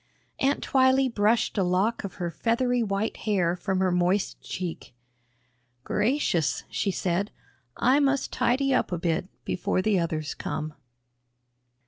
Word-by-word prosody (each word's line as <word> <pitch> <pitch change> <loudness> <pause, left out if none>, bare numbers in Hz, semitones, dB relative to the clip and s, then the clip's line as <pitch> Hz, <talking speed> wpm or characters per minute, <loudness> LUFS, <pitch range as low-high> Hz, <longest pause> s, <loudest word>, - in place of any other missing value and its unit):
Aunt 275 +2 +1
Twylee 260 0 +3
brushed 215 +1 +2
a - - +3
lock 185 +6 +1
of 200 - -6
her 175 -3 -3
feathery 245 +4 +1
white 205 0 -1
hair 185 -5 +1
from 190 +1 -2
her 185 -1 +2
moist 180 +3 +1
cheek. 175 -8 -6 0.9
"Gracious," 210 - +1
she 200 - 0
said, 190 +2 -1 0.5
"I 260 +4 +4
must 280 -1 +1
tidy 270 +3 +2
up - - +1
a 175 - 0
bit 170 +1 -1 0.2
before 185 +1 -1
the 205 -3 +2
others 160 -2 -2
come." 155 0 -4
200 Hz, 135 wpm, -26 LUFS, 180-245 Hz, 0.9 s, I